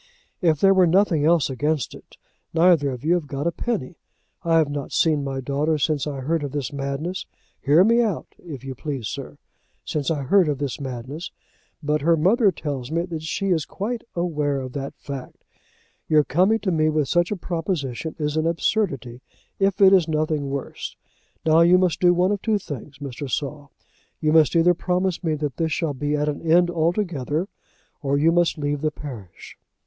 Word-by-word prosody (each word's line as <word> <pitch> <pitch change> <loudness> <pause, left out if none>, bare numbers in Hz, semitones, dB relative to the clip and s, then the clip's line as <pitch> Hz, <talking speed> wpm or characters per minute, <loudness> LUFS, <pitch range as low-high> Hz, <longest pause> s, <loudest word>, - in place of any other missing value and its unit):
If 160 -5 +3
there 195 +2 +5
were 185 -2 +5
nothing 170 -4 +3
else 165 -1 +4
against 145 +1 -1
it, - - -15 0.4
neither 165 -4 +4
of 125 -1 -6
you 165 - +4
have 175 -4 -1
got 140 +2 -4
a 170 - +2
penny. 180 - -4 0.4
I 165 -1 +3
have 160 -2 +4
not 145 -1 -5
seen 155 -3 +2
my 135 -1 -3
daughter 145 +4 0
since 150 0 0
I 140 -2 -4
heard 160 +4 0
of 140 -1 -5
this 145 -1 -3
madness, 140 +6 -4 0.3
hear 150 +5 +5
me 230 +3 +4
out 215 -7 -1
if 145 -7 -9
you 135 -1 -5
please, 135 -4 -4
sir, - - -7 0.5
since 150 -1 -2
I 150 -4 -1
heard 180 +4 +4
of 145 - -1
this 140 -1 -4
madness, 135 +5 -6 0.5
but 150 0 0
her 165 +2 +3
mother 200 +6 +4
tells 140 -6 -5
me 165 +2 0
that 170 -3 -5
she 195 +5 -2
is 165 -4 +2
quite 225 +4 -4
aware 150 -5 -1
of 130 -1 -7
that 140 -1 -5
fact. 140 -3 -8 0.6
Your 155 -1 +4
coming 185 +11 +3
to 190 - 0
me 155 -2 +2
with 150 -2 +1
such 175 +3 +2
a 210 - -1
proposition 165 -5 -3
is 150 -1 -2
an 160 +1 +1
absurdity 145 - -1 0.4
if 195 0 +1
it 195 0 +8
is 180 -4 +5
nothing 155 -2 -1
worse. 140 -1 -5 0.5
Now 160 +1 +5
you 175 +2 +6
must 180 -3 +1
do 175 -1 +6
one 180 +2 +2
of 205 -2 -1
two 220 -2 +1
things, 145 - -8
Mr. 140 0 -6
Saul. 145 +1 -4 0.5
You 155 -1 +1
must 160 0 +5
either 170 +1 +5
promise 180 +1 -1
me 160 -2 0
that 145 -4 -4
this 160 -1 0
shall 155 -1 -1
be 145 +2 -1
at 150 0 0
an 145 -1 -2
end 175 +2 +3
altogether, 170 -2 -1 0.5
or 140 -1 0
you 160 +3 +4
must 175 0 +2
leave 145 -1 -2
the 155 - +1
parish." 125 - -10
155 Hz, 195 wpm, -23 LUFS, 140-175 Hz, 0.6 s, it